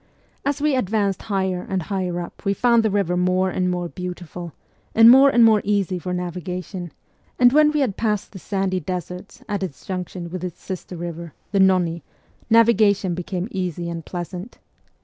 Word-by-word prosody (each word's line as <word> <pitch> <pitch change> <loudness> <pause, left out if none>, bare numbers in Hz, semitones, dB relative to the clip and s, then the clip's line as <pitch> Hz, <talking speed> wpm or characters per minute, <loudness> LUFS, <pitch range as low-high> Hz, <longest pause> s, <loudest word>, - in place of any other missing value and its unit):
As 280 0 -1
we 295 -1 +2
advanced 200 -4 0
higher 190 -3 -1
and 190 -2 -1
higher 180 -1 -2
up 175 - -8
we 200 -1 0
found 235 0 +4
the 220 - +1
river 195 -3 0
more 185 +1 +1
and 180 0 0
more 180 -1 -2
beautiful, 180 -1 -7 0.4
and 225 +1 +9
more 270 +2 +8
and 240 -3 +5
more 215 -2 +5
easy 195 -3 0
for 180 +1 -5
navigation; 180 0 -5 0.5
and 245 0 +5
when 300 0 +5
we 300 -1 0
had 230 -8 -1
passed 210 -3 -1
the 190 - -9
sandy 190 -1 -1
deserts 180 - -6
at 205 -2 -2
its 180 -7 -6
junction 180 -2 -5
with 185 0 -5
its 180 -3 -6
sister 185 -1 -7
river, 170 -2 -6 0.2
the 200 - +1
Nonni, 180 -3 +3 0.5
navigation 215 -5 +4
became 180 +2 -4
easy 175 -2 -3
and 165 -1 -5
pleasant. 180 +6 -7
185 Hz, 175 wpm, -22 LUFS, 180-210 Hz, 0.5 s, and